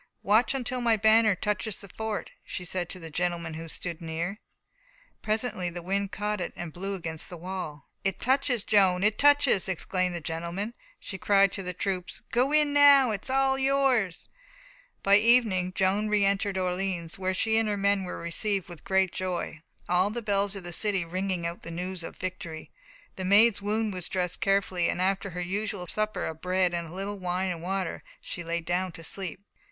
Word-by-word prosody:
"Watch 220 Hz, +6 st, +3 dB
until 255 Hz, -1 st, -2 dB
my 230 Hz, -2 st, +3 dB
banner 220 Hz, 0 st, +5 dB
touches 210 Hz, +1 st, -2 dB
the 200 Hz, -, -10 dB
fort," 220 Hz, +2 st, -4 dB
she 180 Hz, -, -6 dB
said 175 Hz, 0 st, -2 dB
to 185 Hz, -3 st, -6 dB
a 160 Hz, -, -8 dB
gentleman 170 Hz, -1 st, -1 dB
who 165 Hz, +1 st, -7 dB
stood 170 Hz, +1 st, -4 dB
near. 170 Hz, +5 st, -3 dB, 0.8 s
Presently 215 Hz, -4 st, -1 dB
the 175 Hz, 0 st, -7 dB
wind 195 Hz, +2 st, -1 dB
caught 210 Hz, -1 st, -2 dB
it -, -, -4 dB
and 170 Hz, -3 st, -6 dB
blew 195 Hz, +2 st, -3 dB
it -, -, -4 dB
against 165 Hz, -3 st, -4 dB
the 175 Hz, -, -7 dB
wall. 170 Hz, -5 st, -6 dB, 0.2 s
"It 195 Hz, -2 st, -1 dB
touches, 260 Hz, -3 st, +2 dB
Joan, 190 Hz, -3 st, +4 dB
it 215 Hz, +1 st, +2 dB
touches!" 285 Hz, -9 st, +4 dB
exclaimed 185 Hz, 0 st, -1 dB
the -, -, -2 dB
gentleman. 170 Hz, +7 st, -4 dB, 0.3 s
She 190 Hz, -, -6 dB
cried 195 Hz, -1 st, +4 dB
to -, -, -3 dB
the 180 Hz, -1 st, -4 dB
troops: 185 Hz, -1 st, -3 dB
"Go 250 Hz, +4 st, +2 dB
in 300 Hz, -1 st, +3 dB
now, 280 Hz, -4 st, +7 dB, 0.2 s
all 270 Hz, 0 st, +3 dB
is -, -, -3 dB
yours!" 265 Hz, -9 st, +1 dB, 0.7 s
By 200 Hz, +1 st, +6 dB
evening 215 Hz, -5 st, +4 dB
Joan 200 Hz, +3 st, +2 dB
reëntered 200 Hz, -1 st, +2 dB
Orleans, 180 Hz, -2 st, -2 dB
where 185 Hz, 0 st, -1 dB
she 220 Hz, +3 st, +2 dB
and 225 Hz, -1 st, +1 dB
her 205 Hz, -, 0 dB
men 200 Hz, 0 st, +2 dB
were 180 Hz, -, -5 dB
received 190 Hz, +3 st, -2 dB
with 175 Hz, -2 st, -10 dB
great 190 Hz, -1 st, +2 dB
joy, 180 Hz, -3 st, -3 dB, 0.3 s
all 180 Hz, +3 st, +3 dB
the 235 Hz, +2 st, -4 dB
bells 200 Hz, -1 st, +1 dB
of 195 Hz, -, -6 dB
the 175 Hz, 0 st, -5 dB
city 195 Hz, -2 st, +1 dB
ringing 185 Hz, 0 st, -2 dB
out 170 Hz, +1 st, -4 dB
the -, -, -8 dB
news 180 Hz, +2 st, -4 dB
of -, -, -8 dB
victory. 170 Hz, -3 st, -6 dB, 0.5 s
The 190 Hz, -, -4 dB
Maid's 205 Hz, +2 st, +6 dB
wound 210 Hz, +1 st, 0 dB
was 180 Hz, -2 st, -4 dB
dressed 180 Hz, -2 st, -1 dB
carefully, 195 Hz, -3 st, +2 dB
and -, -, -2 dB
after 195 Hz, +2 st, 0 dB
her 180 Hz, 0 st, -5 dB
usual 195 Hz, +1 st, -3 dB
supper 215 Hz, +4 st, -2 dB
of 160 Hz, 0 st, -6 dB
bread 185 Hz, 0 st, +2 dB
with 170 Hz, -1 st, -2 dB
a -, -, -11 dB
little 195 Hz, +2 st, -4 dB
wine 185 Hz, +1 st, -1 dB
and 170 Hz, -2 st, -5 dB
water, 190 Hz, 0 st, -2 dB, 0.2 s
she 175 Hz, -, -6 dB
lay 170 Hz, 0 st, -2 dB
down 180 Hz, +1 st, -1 dB
to 165 Hz, -, -9 dB
sleep. 185 Hz, 0 st, -3 dB
190 Hz, 195 wpm, -28 LUFS, 175-210 Hz, 0.8 s, now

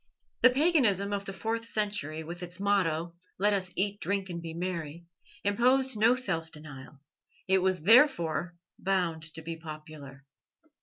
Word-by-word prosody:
The 255 Hz, -, +8 dB
paganism 250 Hz, -, +2 dB
of 200 Hz, 0 st, -3 dB
the 195 Hz, -, -5 dB
fourth 225 Hz, +4 st, -3 dB
century, 205 Hz, -9 st, -1 dB
with 170 Hz, +2 st, -8 dB
its 180 Hz, +1 st, -8 dB
motto, 175 Hz, -5 st, 0 dB, 0.2 s
"Let 205 Hz, +2 st, +3 dB
us 190 Hz, -2 st, -1 dB
eat, 205 Hz, +1 st, 0 dB
drink, 195 Hz, -2 st, -2 dB
and 170 Hz, -1 st, -5 dB
be 165 Hz, -1 st, -7 dB
merry," 170 Hz, -2 st, -5 dB, 0.4 s
imposed 255 Hz, +5 st, +3 dB
no 225 Hz, +4 st, +4 dB
self 165 Hz, -11 st, -2 dB
denial; 145 Hz, -3 st, -10 dB, 0.5 s
it 190 Hz, 0 st, +4 dB
was 185 Hz, -3 st, 0 dB
therefore 180 Hz, -, +4 dB, 0.2 s
bound 180 Hz, -4 st, 0 dB
to 160 Hz, -, -7 dB
be 165 Hz, +1 st, -5 dB
popular. 155 Hz, -3 st, -10 dB
185 Hz, 150 wpm, -29 LUFS, 160-205 Hz, 0.5 s, The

